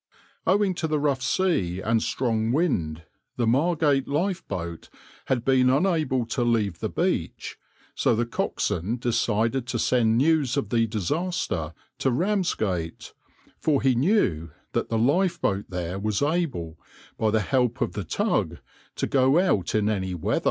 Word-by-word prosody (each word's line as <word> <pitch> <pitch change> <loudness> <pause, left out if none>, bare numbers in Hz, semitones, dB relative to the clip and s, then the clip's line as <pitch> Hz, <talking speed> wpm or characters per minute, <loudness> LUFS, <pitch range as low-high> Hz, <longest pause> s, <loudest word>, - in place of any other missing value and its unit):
Owing 195 +1 +3
to 160 - -1
the 155 -1 0
rough 140 -3 0
sea 125 - 0
and 115 +3 +1
strong 115 -3 0
wind, 85 - 0 0.3
the 120 - +1
Margate 145 +2 +2
lifeboat 145 - -3 0.4
had 125 -2 -1
been 130 -1 +4
unable 145 -4 +1
to 120 +2 -1
leave 110 -7 0
the - - -2
beach, - - -2 0.4
so - - +2
the 120 +2 0
coxswain 110 -2 -2
decided 115 +1 0
to - - -2
send 115 -3 +2
news 145 -2 +2
of 140 - -1
the 115 -1 +2
disaster 105 - -2 0.2
to 135 - +2
Ramsgate, 125 - -1 0.5
for 150 -3 +2
he 135 -1 +3
knew 120 - +1 0.2
that - - -1
the 115 - 0
lifeboat 145 - +1
there 90 +1 -4
was 105 +4 -1
able, 145 - -1 0.4
by 110 - +2
the 110 0 +2
help 125 +2 0
of - - -1
the - - -4
tug, - - -1 0.4
to - - -1
go 135 +2 +3
out 180 - +1
in 105 -1 +2
any 95 -4 -1
weather. 85 - 0
125 Hz, 150 wpm, -25 LUFS, 105-150 Hz, 0.5 s, been